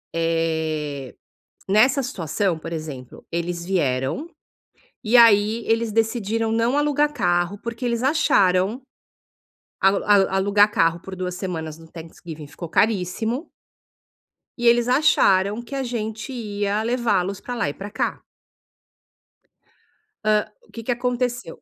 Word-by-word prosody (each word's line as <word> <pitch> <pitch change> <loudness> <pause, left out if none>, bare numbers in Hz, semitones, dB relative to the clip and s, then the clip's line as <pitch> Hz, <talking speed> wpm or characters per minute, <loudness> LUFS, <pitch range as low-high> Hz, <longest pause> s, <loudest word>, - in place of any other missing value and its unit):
eh, 160 -4 -1 0.6
nessa 250 +7 +4
situação, 180 - -1
por 165 +1 -7
exemplo, 145 -6 -7
eles 170 0 -3
vieram, 150 - -1 0.8
e 230 +3 +4
aí, 220 0 +5
eles 225 -1 +1
decidiram 225 0 0
não 230 +4 +1
alugar 295 0 +2
carro 175 -5 0
porque 235 +1 -5
eles 235 0 -1
acharam, 210 - +2 1.0
alu 195 +1 +3
alu 200 -2 +5
alugar 205 +2 +3
carro 165 -2 +2
por 190 0 -8
2 180 -1 -3
semanas 160 -5 -5
no 165 - -14
Thanksgiving 160 -2 -10
ficou 170 +2 -9
caríssimo. 220 - 0 1.1
E 240 - -2
eles 235 0 +4
acharam 210 -6 +3
que 260 +4 -8
a 270 - -1
gente 225 +1 -4
ia 205 -2 -2
levá-los 210 -5 0
pra 245 - -6
lá 230 -11 -1
e 145 - -5
pra 200 +1 -8
cá. 225 - -2 2.0
Hã, 215 0 +1 0.2
o - - -24
que 230 - -8
que 245 - -1
aconteceu? 245 -5 -2
205 Hz, 130 wpm, -22 LUFS, 170-235 Hz, 2.0 s, aí